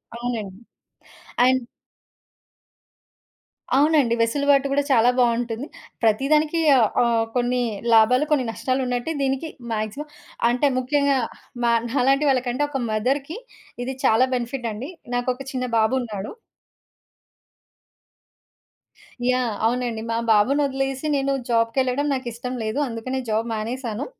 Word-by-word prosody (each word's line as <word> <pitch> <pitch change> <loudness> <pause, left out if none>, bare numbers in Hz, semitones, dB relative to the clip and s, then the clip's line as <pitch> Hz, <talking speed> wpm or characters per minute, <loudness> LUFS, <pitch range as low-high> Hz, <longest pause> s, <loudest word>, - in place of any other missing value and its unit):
అవునండి. 225 -5 -4 0.9
అండ్ 260 0 +3 2.2
అవునండి. 290 -4 +3
వెసులుబాటు 280 +4 +2
కూడా 285 +1 +2
చాలా 245 -1 +5
బావుంటుంది. 240 +2 0 0.4
ప్రతిదానికి 300 +8 +2 0.2
ఆహ్, 225 -4 +4 0.2
ఆహ్, 230 -1 +2
కొన్ని 245 0 +1 0.3
లాభాలు 240 +6 +5
కొన్ని 265 -4 +2
నష్టాలున్నట్టే 255 +3 -2
దీనికి 270 +3 -1 0.2
మాక్సిమం 215 +8 -4 0.4
అంటే 250 +4 +2
ముఖ్యంగా 280 +1 +2 0.5
మ - - +3 0.2
నాలాంటి 275 +3 +2
వాళ్ళకంటే 255 0 0
ఒక 275 -2 -3
మదర్‌కి 270 - -1 0.5
ఇది 260 +1 -4
చాలా 225 +4 +5
బెనిఫిట్ 245 0 -3
అండి. 250 +8 -6 0.3
నాకొక 250 +1 -1
చిన్న 255 -1 -2
బాబున్నాడు. 220 -3 -1 3.0
యాహ్! 250 -4 +1
అవునండి. 240 -1 -1
మా 230 - 0
బాబునొదిలేసి 270 +4 +1
నేను 275 0 0 0.2
జాబ్‌కెళ్ళడం 250 +4 +1
నాకిష్టం 250 0 -5
లేదు. 220 +5 -2
అందుకనే 245 +3 -4
జాబ్ 225 +2 0
మానేసాను. 230 +1 -4
250 Hz, 100 wpm, -23 LUFS, 230-275 Hz, 3.0 s, చాలా